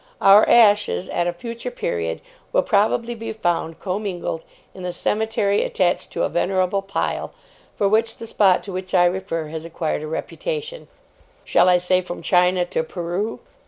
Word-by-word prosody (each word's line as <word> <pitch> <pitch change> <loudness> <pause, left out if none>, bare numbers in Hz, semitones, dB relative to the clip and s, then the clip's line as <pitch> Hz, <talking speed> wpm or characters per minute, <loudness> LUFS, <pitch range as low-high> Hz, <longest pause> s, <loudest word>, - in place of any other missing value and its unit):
Our 200 +2 +7
ashes, 205 - +4
at 175 - 0
a - - +1
future 230 +7 -6
period, 85 - -3 0.3
will - - +3
probably 230 +4 +1
be 225 -1 -6
found 175 -6 -1
commingled 185 -4 -4 0.3
in 190 - -11
the 180 0 -3
cemetery 210 +1 0
attached 180 -1 0
to - - -1
a - - +2
venerable 185 +2 0
pile, 195 +1 -3 0.4
for 200 - +1
which 225 +3 +1
the 230 - -8
spot 195 -4 +3
to 200 - -7
which 185 +1 -4
I 175 -1 +6
refer 175 -3 -2
has 160 0 -6
acquired 165 -2 -3
a 155 - -5
reputation, 475 - -5 0.6
shall 175 +1 +4
I 180 - +6
say 180 +1 +1
from 175 -1 -7
China 180 0 +3
to 175 - -1
Peru? 175 +6 -4
185 Hz, 165 wpm, -22 LUFS, 175-215 Hz, 0.6 s, Our